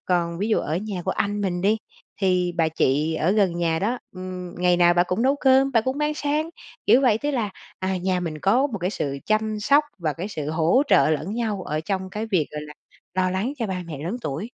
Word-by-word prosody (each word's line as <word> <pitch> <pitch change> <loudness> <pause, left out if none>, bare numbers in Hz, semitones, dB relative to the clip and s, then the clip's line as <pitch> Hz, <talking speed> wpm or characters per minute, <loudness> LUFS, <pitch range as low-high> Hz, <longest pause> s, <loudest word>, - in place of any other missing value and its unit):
còn 170 -2 0
ví 210 +3 -1
dụ 220 - +3
ở 155 +3 -2
nhà 195 -2 -4
của - - 0
anh 205 0 -1
mình 180 -3 -1
đi, 210 +4 +3 0.4
thì 180 -2 +2
bà 165 -1 +3
chị 155 +1 +1
ở 160 +3 +1
gần 195 -5 +2
nhà 165 -1 +1
đó, 235 +7 -1 0.2
ưm, 185 -1 -6
ngày 180 -1 +3
nào 175 0 +5
bả 175 - +5
cũng 185 +6 -1
nấu 275 +2 +3
cơm, 270 0 +4
bả 230 - +5
cũng 260 +5 -2
mang 300 0 0
sang, 300 +2 -1 0.4
kiểu 255 - +6
vậy, 225 -4 +4
tức 290 +3 -1
là, 230 -7 -1 0.3
à, 190 0 -1
nhà 185 0 0
mình 160 -3 -4
có 240 - +3
một 220 -8 -5
cái 180 +2 -1
sự 140 -8 -3
chăm 215 0 0
sóc, 285 +6 +4
và 155 -3 -1
cái 180 +7 -5
sự 155 -6 -4
hỗ 165 - +3
trợ 140 +3 +5
lẫn 160 +7 -1
nhau 215 -5 -2
ở 155 -1 -2
trong 190 +2 -3
cái 215 +2 -4
việc, 185 -9 +1
gọi 150 - -5
là, 150 0 -9 0.4
lo 185 0 +1
lắng 200 +9 -1
cho 230 - -1
ba 185 -2 -3
mẹ 155 -4 -6
lớn 175 +11 -3
tuổi. 155 +8 -3
185 Hz, 250 wpm, -24 LUFS, 170-220 Hz, 0.4 s, kiểu